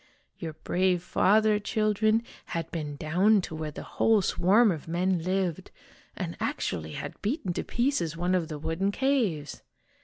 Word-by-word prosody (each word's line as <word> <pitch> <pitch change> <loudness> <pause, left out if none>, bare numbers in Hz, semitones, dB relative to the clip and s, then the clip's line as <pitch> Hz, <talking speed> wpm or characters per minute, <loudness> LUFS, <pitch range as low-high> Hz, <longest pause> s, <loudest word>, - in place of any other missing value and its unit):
" - - -42
Your 160 -3 -5
brave 180 +3 0
father, 210 +3 +3
children, 215 +1 +1 0.2
had 165 -1 -4
been 150 -3 -4
clown 185 +8 +3
to 170 - -7
where 155 -1 -4
the 150 - -8
whole 220 -3 +2
swarm 205 +6 +4
of 160 -3 -5
men 175 +1 0
lived, 185 -1 -1 0.5
and - - -4
actually 80 -1 -3
had - - -7
beaten 210 - -1
to - - -2
pieces 235 - 0
one 180 +2 0
of 175 -3 +1
the 155 - -5
wooden 165 +6 -1
caves 220 - 0
185 Hz, 160 wpm, -28 LUFS, 160-215 Hz, 0.5 s, swarm